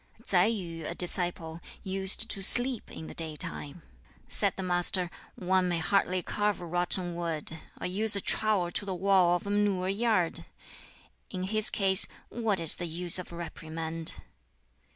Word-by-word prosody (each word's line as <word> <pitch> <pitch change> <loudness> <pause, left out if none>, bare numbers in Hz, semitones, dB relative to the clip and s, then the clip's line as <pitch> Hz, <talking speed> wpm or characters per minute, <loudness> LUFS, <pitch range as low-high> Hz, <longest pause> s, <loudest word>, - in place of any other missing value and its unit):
Tsai 180 -1 +3
Yu, 170 -8 -4
a - - -5
disciple, 175 -2 -1 0.2
used 190 +3 +3
to 195 - -2
sleep 245 +4 +3
in 160 - -9
the - - -9
daytime. 155 0 -4 0.4
Said - - 0
the 190 - -4
Master, 175 0 +1 0.2
"One 185 0 0
may 175 - 0
hardly 185 +1 0
carve 210 -1 -1
rotten 175 +1 0
wood, 165 -2 -4 0.2
or - - -5
use 205 +4 +2
a - - 0
trowel 200 -4 +1
to - - -2
the 195 -2 -4
wall 185 -1 +3
of 175 - -5
a 200 - -3
manure 200 -3 0
yard! 200 -4 0 0.8
In 185 -2 -5
his 215 +3 +3
case, 195 -1 +3 0.2
what 220 -5 -1
is 165 -2 +3
the 175 - -4
use 175 +2 +3
of 180 - -8
reprimand? 165 -1 -5
180 Hz, 155 wpm, -29 LUFS, 170-200 Hz, 0.8 s, Tsai